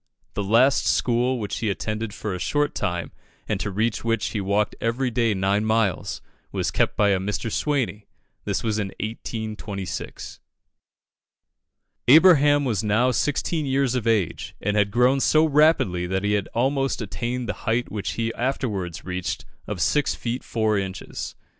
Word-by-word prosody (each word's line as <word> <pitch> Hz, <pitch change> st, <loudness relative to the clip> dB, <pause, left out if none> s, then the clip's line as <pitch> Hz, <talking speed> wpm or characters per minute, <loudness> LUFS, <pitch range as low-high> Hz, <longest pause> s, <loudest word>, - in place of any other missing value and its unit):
The 100 Hz, -, -2 dB
last 120 Hz, +7 st, +4 dB
school 125 Hz, +1 st, +2 dB
which 105 Hz, -2 st, -3 dB
he 110 Hz, -, -1 dB
attended 110 Hz, +2 st, -3 dB
for 105 Hz, 0 st, -4 dB
a 90 Hz, -, -4 dB
short 145 Hz, +9 st, 0 dB
time, 85 Hz, -1 st, -2 dB, 0.4 s
and -, -, -1 dB
to -, -, -2 dB
reach 110 Hz, +3 st, -1 dB
which 115 Hz, -2 st, 0 dB
he 105 Hz, -, -2 dB
walked 100 Hz, +2 st, +1 dB
every 125 Hz, +3 st, 0 dB
day 115 Hz, -2 st, +1 dB
nine 100 Hz, +2 st, +1 dB
miles, 110 Hz, -4 st, 0 dB, 0.3 s
was -, -, -1 dB
kept -, -, 0 dB
by 105 Hz, -1 st, +4 dB
a 95 Hz, -1 st, +2 dB
Mr. 105 Hz, +3 st, -3 dB
Swaney. 125 Hz, -9 st, -1 dB, 0.4 s
This -, -, -2 dB
was 110 Hz, -2 st, 0 dB
in 100 Hz, -, -1 dB
1826. 110 Hz, -3 st, -5 dB, 1.7 s
Abraham 145 Hz, -1 st, +6 dB
was 110 Hz, -6 st, 0 dB
now 110 Hz, +5 st, +3 dB
sixteen 145 Hz, +4 st, 0 dB
years 135 Hz, -1 st, +1 dB
of 120 Hz, -3 st, -1 dB
age, 105 Hz, -7 st, 0 dB
and 105 Hz, +1 st, -1 dB
had 105 Hz, -1 st, +3 dB
grown 125 Hz, +5 st, +3 dB
so 155 Hz, +3 st, +4 dB
rapidly 145 Hz, -, +3 dB
that 95 Hz, +1 st, -1 dB
he 105 Hz, -, +1 dB
had 100 Hz, -2 st, -1 dB
almost 135 Hz, +3 st, +1 dB
attained 120 Hz, +3 st, -3 dB
the -, -, -1 dB, 0.2 s
height 120 Hz, -1 st, 0 dB
which 105 Hz, -1 st, -3 dB
he 115 Hz, 0 st, -2 dB
afterwards 105 Hz, -, -3 dB
reached 90 Hz, -1 st, -3 dB, 0.2 s
of -, -, -4 dB
six 150 Hz, -1 st, +2 dB
feet 120 Hz, +2 st, -4 dB
four 110 Hz, -2 st, 0 dB
inches. 95 Hz, 0 st, -5 dB
110 Hz, 160 wpm, -24 LUFS, 100-125 Hz, 1.7 s, Abraham